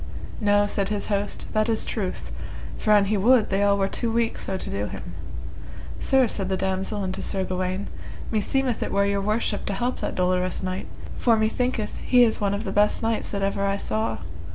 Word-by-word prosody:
No, 205 -1 +4
said 200 -1 -1
his 210 -1 -1
host, 200 +1 -1
that 215 +1 +2
is 225 - +3
truth, 195 -5 -3 0.5
for - - -2
an 205 -1 +6
he 210 +1 +1
would 230 +3 +4
they 195 +1 +1
all 200 0 +4
were 195 -1 +2
too 230 +3 -1
weak 230 0 0
so 190 - -2
to - - -5
do 100 +1 -2
him. - - -7 0.9
Sir, 265 -2 +4
said 195 -3 0
the 190 - 0
damosel 190 +2 -1
unto 185 0 -3
Sir 190 - -1
Gawaine, 185 +1 -2 0.4
meseemeth 245 +3 0
it - - -2
were 200 0 +3
your 200 0 +1
worship 210 0 0
to 200 - 0
help 240 +6 -1
that - - -3
dolorous 180 0 +1
knight, 185 0 -3 0.3
for 230 -2 +3
methinketh 220 0 0
he 250 -1 +6
is 225 -2 +2
one 200 -1 +1
of 205 - -4
the - - -3
best 210 +2 +2
knights 225 0 0
that 200 -1 -2
ever 200 0 0
I 200 0 +1
saw. 110 - -1
200 Hz, 205 wpm, -25 LUFS, 190-220 Hz, 0.9 s, an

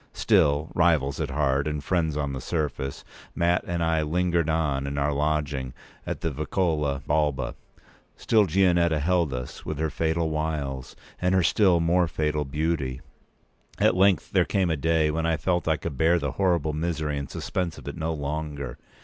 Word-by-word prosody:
Still, 75 +2 +2
rivals 80 -5 +2
at - - -2
heart 70 -1 +1
and 75 -1 -3
friends 80 -3 0
on 70 -2 -2
the 65 - -5
surface, 75 -4 -3 0.3
Mat 85 +1 +2
and 85 -1 -1
I 80 -1 +2
lingered 85 +1 +1
on 75 -4 0
in 70 0 -4
our 70 +1 +1
lodging 70 -3 -1 0.3
in - - -2
the 80 - -1
Vicolo 75 -2 -1
Balba. 75 -2 0 0.6
Still 110 -3 +3
Gianetta 85 -2 +3
held 85 0 +1
us 60 -1 -6
with 80 - -4
her 80 0 -1
fatal 80 0 0
wiles 75 -4 -3 0.3
and 90 +1 +2
her 95 - +3
still 95 -2 +4
more 85 +1 +2
fatal 75 -1 -1
beauty. 70 -2 -2 0.8
At - - +3
length 95 -3 +3
there - - +4
came 95 -3 0
a - - +1
day 80 +1 +2
when 80 +1 -1
I 80 -1 +1
felt 90 +1 0
I 80 -1 +2
could 70 -1 -6
bear 80 +2 +4
the 70 -4 -2
horrible 85 -3 +1
misery 80 -2 -2
and 70 - -6
suspense 90 -4 -3
of - - -12
it 70 - -5
no 80 0 -2
longer. 70 -3 -4
80 Hz, 175 wpm, -26 LUFS, 70-85 Hz, 0.8 s, still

